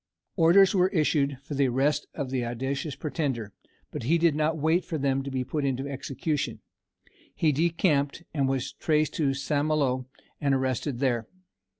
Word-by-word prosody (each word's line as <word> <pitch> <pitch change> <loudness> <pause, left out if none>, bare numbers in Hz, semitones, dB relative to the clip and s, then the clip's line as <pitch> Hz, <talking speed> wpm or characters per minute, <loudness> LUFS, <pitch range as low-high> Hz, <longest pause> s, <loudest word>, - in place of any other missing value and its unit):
Orders 185 +4 +6
were 185 -2 +4
issued 150 -6 +1
for 145 - -7
the 140 -1 +2
arrest 140 +4 +1
of 140 -4 -4
the 130 -2 0
audacious 135 +4 -3
pretender, 140 - -3 0.4
but - - -5
he 155 +9 +2
did 170 -2 +3
not 155 +2 0
wait 160 +4 +2
for 160 - -4
them 135 -1 +1
to 135 - -5
be 130 -1 -2
put 145 +3 -3
into 135 0 -1
execution. 140 +2 -3 0.8
He 155 - +2
decamped, 160 -1 +1
and 140 -3 +1
was 135 -1 -2
traced 155 -1 +1
to 140 -4 +1
St. 145 +1 0
Malo, 135 -5 0 0.3
and 140 -2 +2
arrested 130 0 -1
there. 120 -4 +1
140 Hz, 170 wpm, -27 LUFS, 135-155 Hz, 0.8 s, Orders